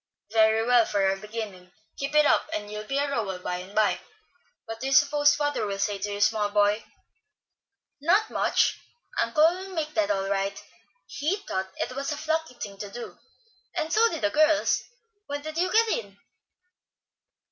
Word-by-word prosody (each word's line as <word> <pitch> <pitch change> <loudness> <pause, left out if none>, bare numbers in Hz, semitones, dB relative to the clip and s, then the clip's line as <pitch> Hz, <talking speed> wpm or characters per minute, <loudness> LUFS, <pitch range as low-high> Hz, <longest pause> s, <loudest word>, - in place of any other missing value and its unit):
"Very 220 0 +4
well, 245 -1 +5
for 200 -3 +1
a 190 - +2
beginning. 205 -3 -7 0.3
Keep 275 +2 -3
it 300 0 +6
up - - +3
and 205 -4 -5
you'll 210 0 -6
be 275 - -1
a 285 +1 +1
Rowell 220 -9 -2
by 180 0 -4
and 185 +3 -10
by. 215 -1 +2 0.6
What 225 0 -7
do 265 - -3
you 270 - 0
suppose 290 0 +5
father 290 -3 -1
will 200 -1 -3
say 200 0 -1
to 205 +1 -3
you, 200 - -4
small 210 0 +2
boy?" 205 +1 +2 1.2
"Not 380 +8 +3
much. - - +2 0.4
Uncle 305 -2 +2
will 370 +2 -4
make 305 -2 -2
that 320 -1 +1
all 195 -1 0
right. 195 0 -1 0.5
He 310 +7 -1
thought 190 0 -2
it 255 - -3
was 275 +1 -3
a 295 - -3
plucky 320 -3 -2
thing 200 -4 -8
to 205 - -6
do, 240 +4 -8 0.6
and 320 -1 -2
so 460 +2 +5
did 325 - -5
the 310 - +2
girls. 310 0 +3 0.5
When 285 0 -4
did 310 +1 -4
you 365 +1 +1
get 455 +1 +4
in?" 200 - -3
240 Hz, 185 wpm, -26 LUFS, 205-305 Hz, 1.2 s, it